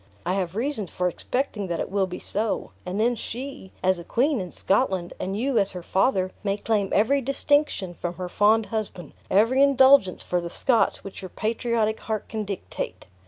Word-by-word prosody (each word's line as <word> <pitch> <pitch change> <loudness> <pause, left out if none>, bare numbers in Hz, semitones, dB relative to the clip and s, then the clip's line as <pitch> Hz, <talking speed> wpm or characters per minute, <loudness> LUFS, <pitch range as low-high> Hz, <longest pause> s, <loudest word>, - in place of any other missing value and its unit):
I 180 - +1
have 185 -2 -2
reasons 230 - -2
for 180 - -1
expecting 215 +2 -2
that 170 -2 -2
it - - -3
will 195 -1 +1
be 180 - -6
so; 215 +1 -2 0.2
and 185 +3 -2
then 235 +3 +3
she, 240 -3 -7
as 185 -1 +3
a - - -7
queen 255 - +1
in 180 - -6
Scotland, 190 -4 0
and 195 +2 -2
you 255 -1 +2
as 200 -1 0
her 180 -2 -6
father, 190 0 +1
may 200 -1 0
claim 210 -2 0
every 275 +7 +3
distinction 275 -7 +1
from 175 0 -5
her 180 0 -4
fond 215 +4 +3
husband, 205 -8 -5 0.2
every 230 +7 +4
indulgence 265 -7 +5
for 180 -1 0
the 170 - -5
Scots, 235 +6 +1
which 195 0 -8
your 185 - -7
patriot 220 +1 0
heart 215 -2 -3
can 215 -1 -4
dictate. 195 -2 -5
205 Hz, 190 wpm, -25 LUFS, 185-240 Hz, 0.2 s, indulgence